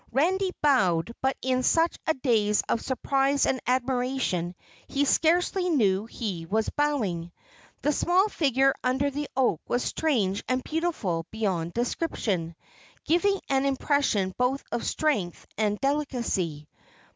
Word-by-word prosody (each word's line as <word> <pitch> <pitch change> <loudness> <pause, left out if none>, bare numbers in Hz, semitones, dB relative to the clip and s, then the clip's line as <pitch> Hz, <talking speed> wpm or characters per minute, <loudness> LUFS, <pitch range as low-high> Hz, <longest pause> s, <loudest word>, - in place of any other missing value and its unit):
Randy 370 +9 +2
bowed, 200 - +3
but 265 0 0
in 255 0 +1
such 330 +5 +2
a 315 - +2
daze 220 -6 +2
of 230 - 0
surprise 275 +1 +1
and 260 - 0
admiration 250 -8 0 0.3
he 285 +1 0
scarcely 355 +5 +2
knew 210 - +2
he 190 -8 -5
was 220 +4 0
bowing. 210 - -1 0.5
The 295 - +3
small 360 +7 +3
figure 270 - +2
under 265 +3 +1
the 290 +1 -4
oak 250 -12 +2
was 245 - 0
strange 215 -11 0
and 255 0 0
beautiful 265 - -2
beyond 185 -6 -2
description, 215 - -2 0.5
giving 390 +4 +2
an 270 -1 +2
impression 270 -8 +1
both 255 +2 +1
of 235 - -2
strength 235 - -1
and 210 -1 0
delicacy. 235 - -1
255 Hz, 130 wpm, -27 LUFS, 205-290 Hz, 0.5 s, bowed